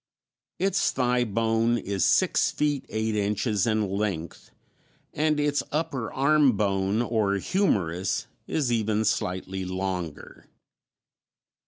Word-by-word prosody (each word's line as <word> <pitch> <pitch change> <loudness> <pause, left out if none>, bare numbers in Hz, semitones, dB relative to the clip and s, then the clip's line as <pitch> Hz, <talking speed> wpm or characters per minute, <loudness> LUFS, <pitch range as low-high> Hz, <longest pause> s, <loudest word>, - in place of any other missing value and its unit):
Its 195 0 +1
thigh 125 -1 +1
bone 115 +1 +1
is 100 -4 -2
six - - +3
feet 145 -2 -1
eight 110 0 -1
inches 105 +1 0
in 110 -2 +1
length, 95 -4 -3 0.6
and 155 0 +1
its 145 0 +1
upper 150 -6 -2
arm 140 0 +4
bone, 100 +2 +1
or 110 -4 +1
humerus, 95 - 0 0.2
is 140 -6 0
even 110 -1 +1
slightly 95 -1 -2
longer. 90 -3 -5
110 Hz, 110 wpm, -26 LUFS, 95-130 Hz, 0.6 s, arm